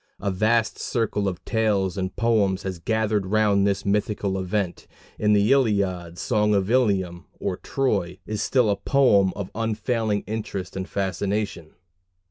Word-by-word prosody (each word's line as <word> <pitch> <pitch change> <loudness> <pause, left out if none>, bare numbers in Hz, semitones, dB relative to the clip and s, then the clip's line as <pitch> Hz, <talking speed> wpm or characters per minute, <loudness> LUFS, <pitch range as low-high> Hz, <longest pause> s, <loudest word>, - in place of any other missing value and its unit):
A 100 0 -1
vast 110 +4 +1
circle 105 -4 -1
of 90 -2 -4
tales 105 -4 +1
and 95 -1 -3
poems 105 -5 +1
has 95 -3 -4
gathered 110 0 0
round 100 -1 +3
this 100 -1 -1
mythical 100 -1 0
event, 95 -1 -2 0.3
and 105 0 +3
the 105 +4 +3
Iliad 100 -10 +1
Song 105 -2 +1
of 100 +2 0
Ilium, 95 -9 +1
or - - -2
Troy 100 -10 -1
is 105 -1 -3
still 120 0 +2
a - - +2
poem 100 -5 +3
of 100 -3 -5
unfailing 110 -1 -1
interest 105 -3 -5
and 95 0 -4
fascination. 100 -3 -2
100 Hz, 145 wpm, -24 LUFS, 95-110 Hz, 0.3 s, round